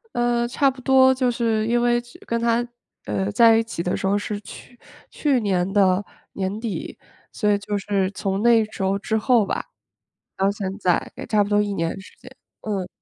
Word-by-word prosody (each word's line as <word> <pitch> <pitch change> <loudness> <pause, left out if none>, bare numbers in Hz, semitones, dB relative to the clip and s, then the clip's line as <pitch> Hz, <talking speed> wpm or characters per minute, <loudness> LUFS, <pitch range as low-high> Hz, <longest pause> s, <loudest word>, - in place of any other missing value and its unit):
呃， 240 0 +1
差 275 +3 +2
不 260 0 -8
多 260 0 +5
就 255 -1 +1
是 225 -2 0
因 240 +1 +2
为 240 0 +2
之 240 0 -14
跟 235 0 -1
他， 235 +1 +1 0.4
呃， 195 +1 -2
在 225 +1 +6
一 225 - +2
起 225 -7 -5
的 180 - -1
时 - - -4
候 200 +1 +2
是 205 0 -3
去 245 +4 -13 0.3
去 280 -4 +1
年 190 -2 0
的 195 -1 +3 0.3
年 195 +2 -3
底， 225 -4 -5 0.3
所 210 -3 0
以 205 - +3
就 205 +1 -4
是 195 -1 -1
从 195 +1 -2
那 230 -2 +5
时 210 -2 -6
候 195 +1 +1
之 220 +2 -1
后 235 -1 +3
吧， - - -3 0.7
到 195 +1 +2
现 195 -2 -4
在 180 -3 0
也 - - -7
差 210 -2 +2
不 200 - -5
多 205 0 +3
1 205 -1 -2
年 165 +2 -2
时 190 - -14
间， - - -13 0.3
嗯。 195 -4 -3
210 Hz, 215 characters per minute, -22 LUFS, 195-240 Hz, 0.7 s, 在